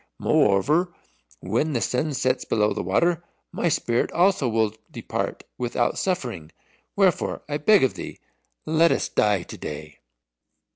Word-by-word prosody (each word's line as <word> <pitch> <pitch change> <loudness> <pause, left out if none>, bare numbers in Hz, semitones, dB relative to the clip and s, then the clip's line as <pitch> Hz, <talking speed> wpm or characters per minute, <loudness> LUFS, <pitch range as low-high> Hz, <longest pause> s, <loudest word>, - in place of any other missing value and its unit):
Moreover, 150 - +2 0.5
when 120 +11 -1
the 120 - +1
sun 140 +5 -1
sets 130 0 0
below 105 -1 +1
the - - -3
water, 170 - +1 0.3
my 170 - 0
spirit 120 -5 0
also 175 -7 +2
will 110 -2 +1 0.2
depart - - -4 0.2
without 120 0 0
suffering. 120 - -3 0.4
Wherefore 190 -4 +1
I 145 0 -2
beg 195 +5 +4
of 130 - +2
thee, - - -8 0.5
let 160 +2 +3
us - - 0
die 105 -4 +2
to - - -10
day." 75 -1 -8
130 Hz, 140 wpm, -24 LUFS, 105-165 Hz, 0.5 s, beg